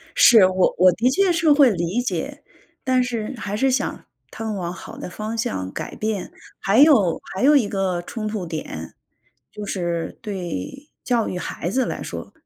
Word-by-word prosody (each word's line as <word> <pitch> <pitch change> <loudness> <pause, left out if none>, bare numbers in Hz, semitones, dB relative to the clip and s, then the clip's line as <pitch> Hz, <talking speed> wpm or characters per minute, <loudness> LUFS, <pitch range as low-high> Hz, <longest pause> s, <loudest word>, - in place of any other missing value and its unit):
是， 225 - +8
我 185 0 +2
我 180 0 +6
的 240 +8 +1
确 375 +5 +3
是 330 -3 +3
会 285 -4 +6
理 180 +5 -1
解， 245 - -4 0.4
但 255 -1 +3
是， 240 0 -3
还 205 -2 -4
是 270 +4 +2
想 265 +3 -2 0.3
他 225 - -7
们 215 -1 -2
往 175 -2 -3
好 185 - -10
的 - - -7
方 215 +4 -5
向 95 - -3
改 - - -6
变。 215 -3 -3 0.3
还 200 +5 +2
有 255 - +5
还 190 - -3
有 290 +2 +6
一 225 -7 +3
个 185 -3 -1
冲 215 +3 -6
突 205 -5 -4
点， 115 - -6 0.6
就 210 -1 -7
是 175 -3 -3
对 195 - -5 0.2
教 240 -3 +1
育 180 - -4
孩 175 0 -4
子 260 +3 +1
来 - - -4
说。 - - -7
215 Hz, 195 characters per minute, -22 LUFS, 180-255 Hz, 0.6 s, 是